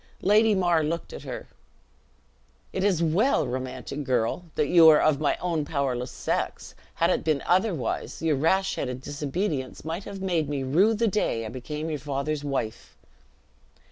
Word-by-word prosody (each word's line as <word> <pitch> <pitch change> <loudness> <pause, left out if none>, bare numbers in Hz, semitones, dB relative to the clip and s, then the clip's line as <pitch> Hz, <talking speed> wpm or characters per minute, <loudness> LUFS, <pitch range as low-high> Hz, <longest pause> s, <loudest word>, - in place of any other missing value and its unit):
Lady 215 +2 +5
Mar 175 -4 +2
looked 165 +2 -3
at - - -7
her. - - -6 1.3
"It 190 - -1
is 185 -5 +2
well, 185 - +2
romantic 130 +2 -4
girl, 125 +5 0
that - - +2
you 165 +1 +7
are 150 - +7
of 155 -3 +3
my 150 - +1
own 170 -4 -1
powerless 135 -4 -2
sex; - - -3 0.2
had - - +2
it - - 0
been 155 -3 0
otherwise, 180 - 0
your 160 -2 +1
rash 190 +7 +1
headed 125 -1 -3
disobedience 145 0 -3
might 165 +5 -4
have 200 -1 -7
made 175 -6 0
me 140 -2 -2
rue 185 +12 +3
the 230 +2 +1
day 180 - 0
I - - -5
became 150 +6 -5
your 150 - -3
father's 145 +1 -3
wife." 135 -6 -4
155 Hz, 165 wpm, -26 LUFS, 135-180 Hz, 1.3 s, you